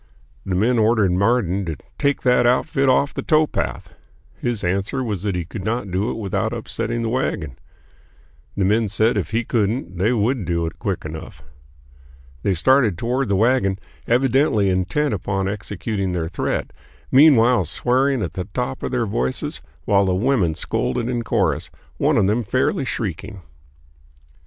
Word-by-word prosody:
The 95 - -1
men 115 +6 +2
ordered 110 -3 +3
Marden 100 0 +1
to 80 -2 -3 0.2
"take 140 -1 +1
that 125 -1 +4
outfit 135 +2 +2
off 140 +2 +2
the - - -3
towpath." 155 -1 0 0.4
His 120 -3 -3
answer 100 +9 -1
was 105 -7 -3
that 100 -2 -2
he 90 -2 -2
could 95 +3 -7
not 110 -1 -2
do 95 +5 0
it - - -3
without 105 +1 -2
upsetting 115 0 -3
the - - -1
wagon. 115 - -2 1.0
The 95 - +2
men 110 +3 +2
said 110 +4 +2
if 100 - -1
he 115 +2 0
couldn't 105 -5 -1
they 105 +6 +2
would 120 0 +1
do 85 -1 -1
it 80 - -6
quick - - -3
enough. 75 -3 -8 1.0
They 95 - +1
started 110 - +3
toward 125 +4 -1
the 100 - +2
wagon, 110 -2 +2 0.3
evidently 125 -4 +3
intent 100 +10 0
upon 95 0 -2
executing 100 -1 -3
their 85 -2 -2
threat, 85 - -3 0.4
meanwhile 125 -6 +6
swearing 130 - +1
at - - -4
the 90 - -4
top 130 +1 -2
of - - -2
their 125 -2 0
voices 65 - -2 0.2
while 100 -1 +3
the 90 - +1
women 100 - +1
scolded 120 +8 -1
in 120 -1 -1
chorus, - - 0 0.3
one - - +2
of - - +4
them 105 +5 +1
fairly 130 +5 0
shrieking. 100 -4 -4
110 Hz, 160 wpm, -21 LUFS, 95-125 Hz, 1.0 s, meanwhile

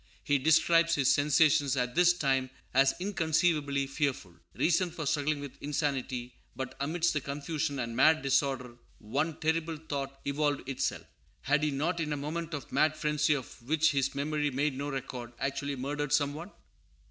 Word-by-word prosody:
He 145 -1 +2
describes 165 +3 +4
his 135 -2 +3
sensations 145 -1 +3
at 125 -1 0
this 175 0 +5
time 135 -6 0 0.2
as 135 +1 +4
inconceivably 160 -6 +1
fearful. 135 - -2 0.2
Reason 175 +1 +2
was 155 -3 -1
struggling 150 0 0
with 140 -2 -9
insanity; 135 -4 -2 0.2
but 130 0 -5
amidst 170 +4 0
the 150 - -1
confusion 145 +2 -3
and 115 -2 -3
mad 155 +3 +4
disorder 135 -3 0 0.2
one 145 +9 -2
terrible 160 0 0
thought 140 -3 -5
evolved 145 -1 -1
itself. 135 - -2 0.4
Had 150 +2 +2
he 150 - +1
not, 155 +5 -1
in 155 -2 -1
a - - -2
moment 155 +3 -4
of 145 - -8
mad 155 0 +2
frenzy 150 -1 +1
of 130 -2 -8
which 155 +6 +2
his 135 -1 0
memory 145 +1 0
made 140 +1 0
no 140 +2 -3
record, 125 -3 -6
actually 140 +1 -2
murdered 145 +2 -3
some 145 0 +2
one? 165 +6 -7
145 Hz, 165 wpm, -30 LUFS, 135-155 Hz, 0.4 s, this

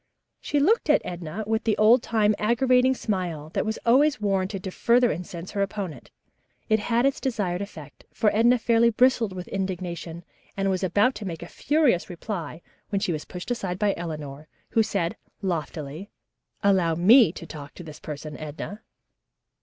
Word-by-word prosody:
She 290 - -1
looked 365 +4 +2
at 300 - +4
Edna 175 +3 -5
with 220 +1 0
the 220 - +1
old 225 +3 +6
time 215 -2 +2
aggravating 250 +3 +3
smile 175 -10 -3
that 210 - -1
was 220 - -1
always 275 +5 +4
warranted 195 -1 -1
to 190 - -4
further 240 +4 +3
incense 170 +1 -6
her 200 - -2
opponent. 195 - -4 0.6
It 220 0 +4
had 235 +3 +1
its 275 - +1
desired 200 -8 -1
effect, 155 -8 -10
for 215 -2 +1
Edna 240 +3 +5
fairly 235 0 +3
bristled 235 -2 +3
with 180 -1 -7
indignation 175 -3 -4 0.3
and 195 0 +1
was 185 0 -1
about 205 +8 +3
to 210 - -7
make 165 -2 -5
a - - -8
furious 290 - +1
reply 175 -3 -6 0.3
when 200 - 0
she 195 -4 -1
was 155 - -5
pushed 180 +6 -7
aside 190 -7 -2
by 205 0 +2
Eleanor, 155 -3 -6 0.2
who 225 - +3
said 190 -5 -1 0.3
loftily, 160 0 -4 0.5
"Allow 185 -5 +3
me 205 +3 +6
to 165 - -8
talk 145 -3 -10
to 175 - -9
this 155 -2 -10
person, 150 0 -7
Edna." 155 +7 -7
195 Hz, 170 wpm, -25 LUFS, 170-225 Hz, 0.6 s, old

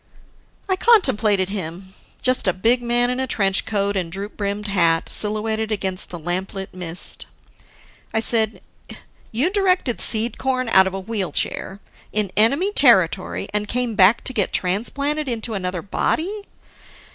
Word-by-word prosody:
I 375 - +1
contemplated 220 - +3
him: 190 -1 -6 0.3
just 255 -4 +1
a 185 - +3
big 230 +7 +2
man 240 +1 +1
in 250 - -3
a 260 - -1
trench 195 -5 0
coat 200 -1 -1
and 175 -4 -2
droop 200 +3 -6
brimmed 205 0 -3
hat 170 -5 +1
silhouetted 220 +1 -2
against 190 -3 0
the 175 - -7
lamp 175 +4 -4
lit 190 0 -6
mist. 180 -1 -3 0.8
I 220 - 0
said, 220 -1 0 0.7
"You 265 +11 +1
directed 365 - +1
Seed 225 +1 +3
corn 255 -2 -1
out 190 -3 +5
of 190 - -4
a - - -3
wheel 195 -1 -3
chair 195 +2 -3 0.3
in 210 -3 +1
enemy 280 - +3
territory, - - +3
and 210 0 -1
came 245 +1 -2
back 205 +2 +4
to 260 - -3
get 205 -5 0
transplanted 280 +10 -1
into 230 -1 -3
another 185 -3 -3
body? 395 - -2
215 Hz, 155 wpm, -21 LUFS, 190-245 Hz, 0.8 s, out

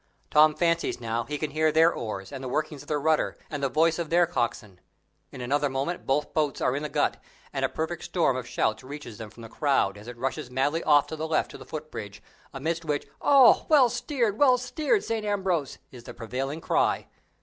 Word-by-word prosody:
Tom 155 0 +6
fancies 170 -6 0
now 115 0 -2
he 150 +1 -4
can 150 0 -3
hear 155 +1 +2
their 160 +2 +5
oars 105 -2 -5
and 135 -1 -7
the - - -4
workings 150 +1 -2
of - - -15
their 150 -1 0
rudder, 155 +1 +1
and 145 -2 -4
the 135 - +1
voice 160 +4 +2
of 165 -3 -3
their 175 +1 +4
coxswain. 115 - -3 0.5
In 130 - -8
another 140 +3 +1
moment 135 +7 -3
both 145 +2 0
boats 150 -4 0
are 125 - +1
in 145 - -2
the 150 - -4
Gut, - - 0 0.4
and - - -2
a - - +2
perfect 160 +1 -4
storm 165 -7 +1
of 130 -1 -5
shouts 110 +1 -1
reaches 135 -5 -9
them 110 -2 -7
from 115 +2 -14
the - - -8
crowd, 110 -7 0
as 105 - -13
it 120 0 -8
rushes 125 0 -3
madly 145 +6 0
off 145 -2 +5
to 160 - -6
the 160 +1 -4
left 160 - 0
to - - -9
the - - -11
footbridge, 145 -10 -7 0.3
amidst 160 +5 -3
which 150 -2 -2
"Oh, 275 -3 +6
well 280 -6 +6
steered, 235 -5 -1
well 260 -3 +6
steered, 305 - 0
St. 225 -1 -2
Ambrose!" 190 -8 -1
is 125 -2 -12
the - - -9
prevailing 135 +6 -4
cry. - - +1
150 Hz, 220 wpm, -27 LUFS, 130-165 Hz, 0.5 s, Tom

